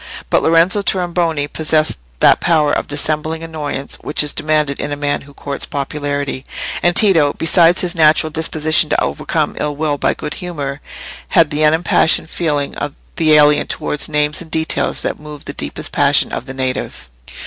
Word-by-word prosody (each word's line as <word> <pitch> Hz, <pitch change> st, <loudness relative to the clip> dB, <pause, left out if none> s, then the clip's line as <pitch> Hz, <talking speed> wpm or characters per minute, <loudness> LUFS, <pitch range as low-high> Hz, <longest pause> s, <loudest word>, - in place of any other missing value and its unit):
But -, -, +3 dB
Lorenzo 165 Hz, +5 st, +3 dB
Tornabuoni 175 Hz, -6 st, -1 dB
possessed 155 Hz, -, +1 dB, 0.2 s
that -, -, +5 dB
power 155 Hz, -4 st, +2 dB
of -, -, -1 dB
dissembling 155 Hz, +2 st, -2 dB
annoyance 150 Hz, -4 st, -5 dB
which 150 Hz, -, 0 dB
is 150 Hz, -, -2 dB
demanded 150 Hz, -2 st, 0 dB
in 145 Hz, -, -3 dB
a -, -, -1 dB
man 145 Hz, 0 st, -2 dB
who 140 Hz, 0 st, -16 dB
courts 140 Hz, -1 st, -5 dB
popularity, 140 Hz, -1 st, -3 dB, 0.4 s
and 175 Hz, 0 st, +2 dB
Tito, 165 Hz, -9 st, +4 dB
besides 170 Hz, +1 st, +4 dB
his 175 Hz, -1 st, -1 dB
natural 155 Hz, -1 st, +3 dB
disposition 155 Hz, 0 st, +2 dB
to -, -, +1 dB
overcome -, -, -2 dB
ill 150 Hz, -1 st, -2 dB
will 145 Hz, -1 st, -2 dB
by -, -, +1 dB
good 150 Hz, -, -5 dB
humour, 150 Hz, -6 st, -5 dB, 0.5 s
had 165 Hz, -2 st, +3 dB
the 150 Hz, +1 st, 0 dB
unimpassioned 160 Hz, +1 st, +2 dB
feeling 145 Hz, -4 st, -2 dB
of 145 Hz, -1 st, -4 dB, 0.2 s
the 155 Hz, -2 st, +3 dB
alien 150 Hz, -1 st, +4 dB
towards 150 Hz, -, -2 dB
names 150 Hz, +1 st, +2 dB
and 170 Hz, -, -11 dB
details 160 Hz, 0 st, -1 dB
that -, -, -3 dB
move 150 Hz, -1 st, -11 dB
the -, -, -6 dB
deepest -, -, -5 dB
passions -, -, +2 dB
of -, -, -5 dB
the 135 Hz, -, -7 dB
native. 130 Hz, -, -4 dB
150 Hz, 170 wpm, -16 LUFS, 145-160 Hz, 0.5 s, that